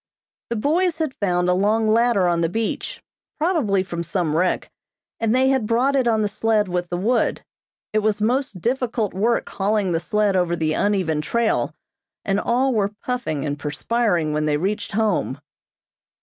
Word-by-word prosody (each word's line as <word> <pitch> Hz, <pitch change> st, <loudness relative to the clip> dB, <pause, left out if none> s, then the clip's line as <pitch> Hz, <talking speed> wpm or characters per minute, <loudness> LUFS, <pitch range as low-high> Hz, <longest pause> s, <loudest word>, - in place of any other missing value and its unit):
The 235 Hz, -, -1 dB
boys 325 Hz, +8 st, +1 dB
had 315 Hz, -5 st, -2 dB
found 180 Hz, -5 st, 0 dB
a 180 Hz, -, +3 dB
long 215 Hz, +4 st, +2 dB
ladder 225 Hz, -4 st, +3 dB
on 170 Hz, -1 st, +1 dB
the 165 Hz, -, +1 dB
beach, 225 Hz, +4 st, -3 dB, 0.3 s
probably 300 Hz, -, +1 dB
from 175 Hz, -2 st, -5 dB
some 170 Hz, -2 st, -1 dB
wreck, 180 Hz, +2 st, 0 dB, 0.5 s
and 225 Hz, +1 st, +1 dB
they 260 Hz, +1 st, +4 dB
had 265 Hz, -5 st, +1 dB
brought 250 Hz, +5 st, +2 dB
it 260 Hz, -3 st, +2 dB
on 220 Hz, -2 st, +2 dB
the -, -, +2 dB
sled 215 Hz, 0 st, +1 dB
with 180 Hz, -1 st, -2 dB
the 175 Hz, -, -2 dB
wood. 230 Hz, +6 st, 0 dB, 0.5 s
It 215 Hz, -, +3 dB
was 215 Hz, 0 st, 0 dB
most 235 Hz, -2 st, 0 dB
difficult 240 Hz, -3 st, -1 dB
work 225 Hz, +5 st, +1 dB
hauling 200 Hz, -1 st, 0 dB
the 165 Hz, -, +1 dB
sled 205 Hz, +3 st, +1 dB
over 175 Hz, -2 st, +1 dB
the 155 Hz, -2 st, 0 dB
uneven 185 Hz, -7 st, +1 dB
trail, 235 Hz, +8 st, 0 dB, 0.5 s
and 195 Hz, 0 st, +1 dB
all 255 Hz, +4 st, +1 dB
were 205 Hz, -2 st, 0 dB
puffing 245 Hz, -, -2 dB
and 145 Hz, 0 st, -3 dB
perspiring 170 Hz, +1 st, 0 dB
when 150 Hz, 0 st, 0 dB
they 150 Hz, -1 st, +1 dB
reached 205 Hz, +6 st, -2 dB
home. 220 Hz, 0 st, 0 dB
210 Hz, 175 wpm, -22 LUFS, 180-235 Hz, 0.5 s, they